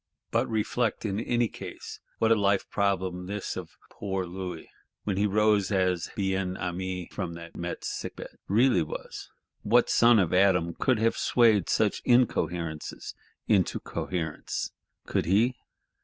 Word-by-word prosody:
But - - +1
reflect, 110 +1 -1
in 100 -1 -1
any 120 0 +1
case, - - -9 0.2
what 115 0 +2
a - - +7
life 100 -2 +1
problem 95 -3 0
this 105 0 -4
of - - -8
poor 95 -2 -3
Louis, 90 -1 -6 0.4
when 100 - -1
he 105 +1 +3
rose 105 -1 +2
as 90 -3 +1
Bien 95 -2 -1
Aimé 90 0 -4
from 90 -4 -3
that 85 0 -10
Metz 85 0 -4
sick - - -5
bed, - - -10
really 115 -1 +4
was! 75 - -6 0.3
What 120 +3 +3
son 120 0 +6
of 90 -5 +2
Adam 90 -3 +3
could 130 +6 +1
have 115 +1 +2
swayed 110 -6 +3
such 105 -2 +1
incoherences 90 -10 0 0.3
into 95 -4 +2
coherence? 85 -4 -4 0.3
Could - - 0
he? 110 +8 +3
95 Hz, 145 wpm, -28 LUFS, 90-110 Hz, 0.4 s, a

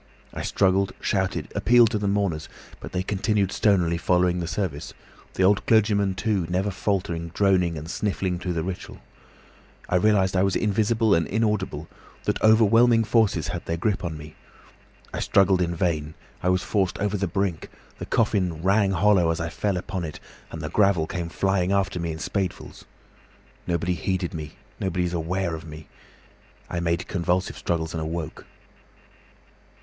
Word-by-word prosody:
I - - -5
struggled, 95 0 +1
shouted, 95 -6 -1
appealed 120 -2 +5
to 110 - 0
the 100 - -1
mourners, 100 -6 -1 0.3
but - - -9
they 90 0 -1
continued 100 0 0
stonily 85 -5 +2
following 90 0 +2
the 85 - -3
service; 85 -6 -4 0.4
the 95 - +1
old 100 +2 +4
clergyman, 100 -3 +3
too, 100 -4 0
never 95 +3 0
faltered 90 -4 -2
droning 90 -4 +2
and 75 +2 -7
sniffing 95 -1 -2
through 90 -1 -3
the 80 -1 -2
ritual. 90 0 -6 0.9
I 90 - +2
realised 95 -1 +3
I 90 - +3
was 95 0 +1
invisible 110 +1 +2
and 85 -2 +2
inaudible, 100 -7 -1 0.4
that - - -1
overwhelming 115 +2 +5
forces 110 -8 +2
had - - -4
their 85 - -1
grip 100 +4 -1
on 80 -3 -4
me. 75 0 -10 0.8
I - - -3
struggled 95 -2 +3
in 85 -1 -1
vain, 80 -3 -1 0.3
I 90 - +1
was 90 0 +2
forced 95 -4 0
over 105 0 -1
the 100 -1 -1
brink, 90 -2 -2 0.3
the - - -6
coffin 90 -7 0
rang 100 +1 +3
hollow 95 -2 +3
as 80 - -1
I 80 0 -2
fell 100 +2 -1
upon 90 0 -4
it, 80 -2 -6 0.3
and - - -7
the - - -3
gravel 100 -6 +3
came 85 0 -4
flying 95 +1 0
after 100 -2 0
me 85 -1 -2
in 80 - -5
spadefuls. 95 +2 -4 0.8
Nobody 85 0 0
heeded 90 0 -2
me, 75 -2 -6 0.3
nobody 90 -1 -1
was 90 0 -2
aware 85 +1 -1
of 80 - -6
me. 75 0 -10 0.8
I 85 - -1
made 85 0 -1
convulsive 90 0 -1
struggles 80 -2 -2
and 80 - -3
awoke. 80 0 -5
95 Hz, 165 wpm, -25 LUFS, 85-100 Hz, 0.9 s, appealed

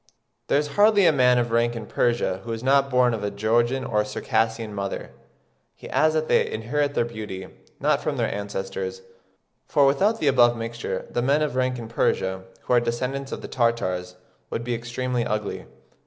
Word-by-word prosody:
There - - +3
is 145 0 0
hardly 205 -2 +6
a - - +7
man 125 -3 +4
of 120 -1 0
rank 120 +1 +2
in 115 -2 -6
Persia 115 -6 0
who 115 - -6
is 115 +1 -6
not 135 +1 +3
born 125 -2 +3
of 110 -2 -3
a 105 - 0
Georgian 120 +5 +1
or 105 -3 +1
Circassian 110 0 -1
mother." 100 -1 -4 0.6
He - - -11
adds 155 0 +3
that 155 0 0
they - - +3
inherit 145 +6 -1
their 120 - +2
beauty, 105 -5 -7 0.3
"not - - +2
from - - -2
their - - 0
ancestors, 95 -2 -4 0.6
for 140 - +4
without 200 +12 +2
the - - -1
above 120 -3 +5
mixture, 115 +1 -4
the 120 - 0
men 140 +5 +2
of 145 -4 -2
rank 130 0 0
in 115 -2 -7
Persia, 95 -4 -1 0.2
who - - -1
are 120 - +6
descendants 125 +4 -3
of - - -6
the - - -5
Tartars, 95 -7 -1 0.3
would 115 - -3
be 120 0 -2
extremely 120 +1 -2
ugly." 105 -2 -3
120 Hz, 190 wpm, -24 LUFS, 110-130 Hz, 0.6 s, a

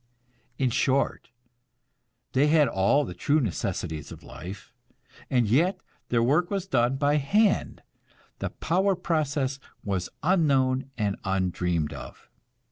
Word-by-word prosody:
In 130 -2 +1
short, 135 +3 0 1.0
they 135 +3 +4
had 150 -1 +5
all 100 +10 +2
the 90 - -6
true 140 - +1
necessities 90 - -3
of - - -11
life; 95 +5 -9 0.6
and 125 -4 +2
yet 165 - +2 0.3
their 115 -1 +2
work 150 +8 +2
was 195 -2 -2
done 125 -7 +2
by 145 +2 +2
hand, 200 +9 +1 0.6
the - - -2
power 190 +4 +1
process 145 -6 -1 0.2
was 95 -3 -2
unknown 135 -7 +2
and 105 -3 -1
undreamed 90 -4 -1
of. - - -11
135 Hz, 125 wpm, -26 LUFS, 100-155 Hz, 1.0 s, had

